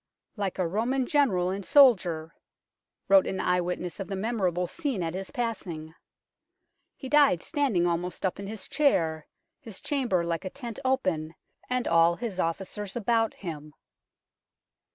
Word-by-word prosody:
" - - -63
Like 200 -4 -3
a 185 -3 +1
Roman 240 +8 0
general 220 - +2
and 195 +1 -4
soldier," 180 - +4 0.7
wrote 195 -1 +6
an 190 - -3
eye 180 0 +2
witness 180 +1 -4
of 195 - -4
the 195 - -4
memor 215 0 0
able 180 +1 -1
scene 255 - -3
at 165 0 -3
his 190 +1 -5
passing, 175 -10 -4 0.5
" - - -53
he 265 - -7
died 280 - +4
standing 265 - +1
almost 175 +2 -2
up 185 - -1
in 200 - -6
his 210 -2 -6
chair, 160 - +1 0.3
his 225 -9 -10
chamber 245 -12 0
like 170 +1 -2
a 185 - -4
tent 235 -2 -7
open, 185 -12 0 0.3
and 250 -1 0
all 170 +1 +4
his 215 -3 -5
officers 195 +4 -3
about 230 -1 +1
him." 155 -5 -8
190 Hz, 160 wpm, -27 LUFS, 175-240 Hz, 0.7 s, wrote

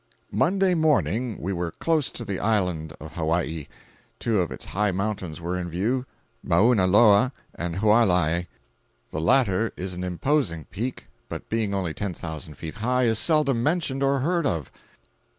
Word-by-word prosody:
501.jpg - - -30
(93K) - - -3
Monday 190 +1 +3
morning 130 - +1
we 95 +4 -2
were 85 -2 -2
close 160 -4 0
to 120 - -6
the 100 -3 -3
island 90 -8 0
of 80 0 -9
Hawaii. 80 -2 -1 0.5
Two 110 -4 0
of 85 - -2
its - - -6
high 105 +2 0
mountains 95 -4 -3
were 85 +2 -3
in 90 -1 -3
view—Mauna 115 0 +1
Loa 105 +5 +6 0.2
and 85 -1 -4
Hualaiai. 90 -5 +3 0.6
The 75 - -3
latter 110 +2 +3
is 90 0 -4
an 90 +1 -5
imposing 90 - 0
peak, 120 +7 -4 0.2
but - - -7
being 110 -3 0
only 90 -5 -2
ten 100 -1 -4
thousand 80 -1 -7
feet 80 +6 -7
high 125 +3 +1
is 110 -2 +2
seldom 150 -6 +3
mentioned 150 -2 0
or 135 -1 +2
heard 170 +1 +1
of. 80 -6 -2
100 Hz, 165 wpm, -25 LUFS, 85-125 Hz, 0.6 s, Loa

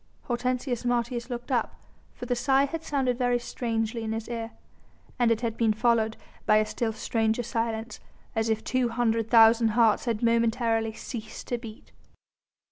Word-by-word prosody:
Hortensius 250 0 -2
Martius 240 0 -1
looked 245 +2 -5
up, 250 - 0 0.4
for - - -7
the 245 0 0
sigh 270 +3 +3
had 325 +3 -5
sounded 265 -5 0
very 245 -1 +2
strangely 230 -1 -2
in 220 0 -2
his 225 0 -4
ear, 230 -1 -4 0.7
and 240 -1 +4
it 230 0 +1
had 230 -2 -2
been 225 -2 +2
followed 220 0 +1 0.3
by 215 - +6
a 215 - +3
still 225 +1 -2
stranger 225 +1 0
silence, 230 -1 -3 0.4
as 225 0 0
if 220 0 0
two 255 -2 0
hundred 230 -1 0
thousand 225 0 +6
hearts 225 -1 +4
had 230 -2 -1
momentarily 230 -1 +2
ceased 220 -1 -8
to 245 - -1
beat. 225 -2 -11
235 Hz, 165 wpm, -27 LUFS, 225-245 Hz, 0.7 s, by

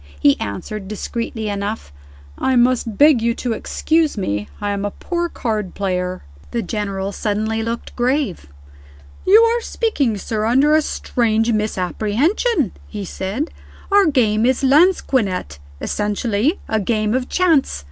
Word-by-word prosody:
He 140 - +4
answered, 190 - -5
discreetly 220 +1 -4
enough, 200 - -4 0.4
"I 260 - 0
must 240 -3 +2
beg 290 -5 +6
you 235 0 +1
to 245 -2 -2
excuse 315 +4 0
me; 105 - -2
I 205 0 -2
am 200 0 -2
a 205 - 0
poor 345 - -3
card 215 - -3
player." 185 -2 -2 0.3
The 235 -1 -2
General 195 -1 -3
suddenly 215 +2 -1
looked 230 +1 -4
grave. 250 - 0 0.8
"You 410 +4 +8
are 465 +1 +2
speaking, 290 - 0
sir, 215 +2 -3
under 270 +6 +4
a 310 - +4
strange 230 -5 0
misapprehension," 220 - 0 0.2
he 205 -2 -6
said. 200 - -3 0.4
"Our 400 -2 +5
game 225 -7 +2
is 260 +2 +2
lansquenet 260 - +2 0.2
essentially 210 - 0
a 220 - 0
game 215 +1 0
of 255 0 -1
chance. 330 - +2
225 Hz, 135 wpm, -19 LUFS, 205-275 Hz, 0.8 s, You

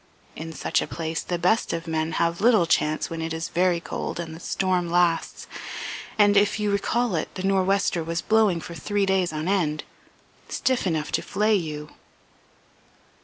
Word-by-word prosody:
In 160 +1 -6
such - - 0
a - - -3
place 165 -1 -3
the 175 - -2
best 185 +6 +2
of 165 0 -3
men 160 -1 -1
have 170 +1 0
little 220 -5 +5
chance 155 -1 +1
when 165 -1 -4
it 160 0 -3
is 160 0 -4
very 175 0 +2
cold 170 - -5
and 165 -2 -5
the - - -10
storm 180 -1 0
lasts. 175 -1 +1 0.7
And, 205 -1 +5
if 205 +1 +3
you 210 -1 +1
recall 230 +3 0
it, 160 - -2
the 185 - -4
nor'wester 195 -2 +2
was 165 +1 -2
blowing 215 -6 +3
for 170 - -8
three 200 +5 0
days 190 -3 +1
on 155 +1 -3
end, 165 -6 +1 0.7
stiff 255 -6 0
enough 155 -3 -1
to - - +1
flay 210 +2 +1
you." 150 -6 -2
175 Hz, 175 wpm, -25 LUFS, 165-200 Hz, 0.7 s, little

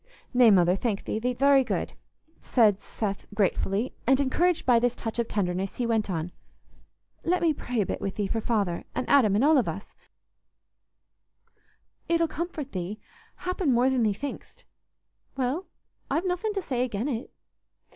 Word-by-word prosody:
"Nay, 245 -2 +6
Mother, 180 -3 +5
thank 205 -1 -2
thee; 215 - -2
thee't 250 +1 -2
very 275 -1 +5
good," 250 - -3 0.5
said 215 -5 +3
Seth, 200 -3 -4
gratefully; 205 +3 0
and 265 +1 +4
encouraged 330 +6 +1
by 245 -2 +5
this 245 +1 +1
touch 225 0 -5
of 235 - 0
tenderness, 185 -1 -2
he 245 - -1
went 225 -3 0
on: 170 -1 -3 0.9
"Let 360 +2 +1
me 330 -2 +2
pray 245 -5 -2
a - - 0
bit - - -4
with 195 - -3
thee 205 - -1
for 225 +3 -2
Father, 205 -7 -1
and 255 - -2
Adam, 230 -8 +4
and 215 - +2
all 300 0 +5
of 245 - -1
us—it'll 335 0 -8
comfort 320 -4 -5
thee, 185 +3 -4 0.4
happen, 365 -4 -1
more 250 +2 +3
than 260 -2 +1
thee 215 -2 +3
thinkst." 275 +8 -7 0.7
"Well, 270 +8 -1 0.4
I've 335 - 0
nothin' 370 +4 -1
to 390 - -2
say 250 -5 -1
again' 235 0 -2
it." 245 -4 -3
245 Hz, 165 wpm, -27 LUFS, 205-280 Hz, 0.9 s, Nay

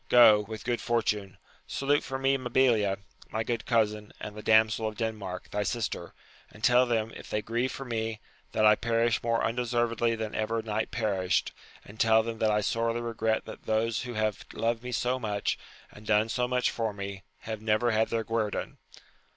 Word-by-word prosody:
Go, 120 -4 +8
with 110 +1 -6
good 120 -1 -1
fortune! 105 -4 -1 0.3
Salute 145 +1 +1
for 135 - -4
me, 135 +1 +2
Mabilia, 120 -6 +2 0.3
my 110 +1 -1
good 115 0 -3
cousin, 105 -3 +1
and 105 - -7
the 105 - -7
damsel 110 0 +4
of 110 -1 -6
Denmark, 105 -5 -4
thy 105 - -1
sister; 95 -8 -3 0.3
and 105 - -16
tell 125 +1 +5
them, 115 -2 0
if - - -10
they 105 - -1
grieve 120 +3 -1
for 135 - -6
me, 110 -2 -3 0.3
that 110 - +2
I 105 - +8
perish 115 +1 +1
more 115 0 +1
undeservedly 120 -1 +1
than 110 -1 -4
ever 110 +1 -1
knight 110 0 -2
perished; 100 -6 0 0.3
and 105 +2 -13
tell 110 0 +5
them 115 -1 -5
that 110 - +3
I 105 0 +2
sorely 115 +3 0
regret 110 -1 -1
that - - -10
those 110 +1 +1
who 120 -2 -6
have 110 -2 -1
loved 115 +1 0
me 125 +1 -6
so 125 +2 0
much, 105 -4 -1 0.3
and 105 - -14
done 110 +1 +2
so 125 +1 0
much 125 0 +1
for 110 -2 -2
me, 100 -1 -6 0.2
have 110 -1 -5
never 110 +2 +2
had 110 0 +2
their 115 -1 0
guerdon? 110 -1 -2
110 Hz, 190 wpm, -29 LUFS, 105-120 Hz, 0.3 s, Go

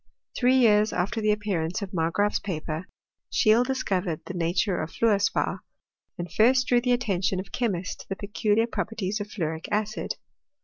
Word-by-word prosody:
Three 255 0 +3
years 215 -4 +5
after 205 +6 -1
the 215 0 +3
appear 205 -5 -1
ance 165 +6 -2
of 195 - -6
Margraaf's 175 +5 +1
paper, 160 -2 -4 0.4
Scheele 220 +2 +4
discovered 195 -10 -1
the - - -6
nature 175 +3 0
of 155 - -4
fluor 220 -3 +2
spar, 205 - 0 0.6
and 175 -1 -6
first 255 +3 +4
drew 245 -2 +3
the 250 0 +1
attention 195 -6 +1
of 190 - -7
chemists 190 -7 -2
to - - -13
the 195 - -2
peculiar 210 +2 +1
properties 220 -3 -3
of 205 - -4
fluoric 160 -5 -3
acid. 210 0 -2
205 Hz, 170 wpm, -26 LUFS, 180-225 Hz, 0.6 s, years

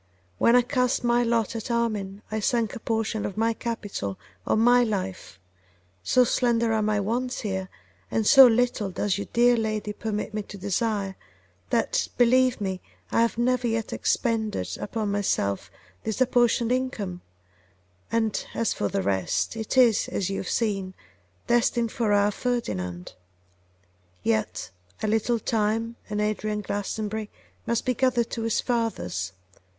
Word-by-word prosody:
When 235 - +5
I 250 - +6
cast 250 -1 0
my 240 0 +3
lot 230 -2 0
at 225 +1 -5
Armine 215 -4 -1
I 220 - -1
sank 230 0 0
a - - -6
portion 220 -1 -1
of 195 - -4
my 225 +1 +2
capital 205 - -4 0.3
on - - +2
my 245 +2 +5
life; 190 - -4 0.6
so 250 - +4
slender 235 -2 +2
are 220 - +1
my 210 0 +1
wants 245 +5 -2
here, 190 -3 -3 0.4
and 220 - 0
so 270 +3 +9
little 235 -3 +1
does 200 +1 -1
your - - -4
dear 240 +1 +5
lady 215 -2 -2
permit 210 0 -4
me 215 - -1
to 200 0 -10
desire, 200 0 -1 0.5
that, - - +1
believe 250 +1 +4
me, 190 -2 -3 0.3
I - - +3
have 230 0 +1
never 250 0 +1
yet 225 -1 -2
expended 215 - -1
upon 215 -1 -2
myself 140 - -1 0.3
this 220 - -3
apportioned 245 -2 +3
income; 230 -9 -2 0.9
and 225 -2 0
as 230 - +1
for 100 - -1
the 95 - -1
rest, 95 - 0
it 225 +3 -3
is, 235 -5 +5
as 195 -1 -2
you 195 - -2
have 190 - -4
seen, 195 -5 -1 0.5
destined 235 -1 +2
for 230 -5 0
our 205 0 +4
Ferdinand. 95 - -3 1.1
Yet 110 -5 -1 0.3
a - - +2
little 225 +2 +1
time 225 +1 -1
and 210 0 -2
Adrian 210 0 -1
Glastonbury 210 +1 -3 0.4
must 235 -1 0
be 255 - +2
gathered 240 -2 +1
to 230 - -3
his 225 -1 0
fathers. 95 - -2
220 Hz, 150 wpm, -26 LUFS, 200-235 Hz, 1.1 s, so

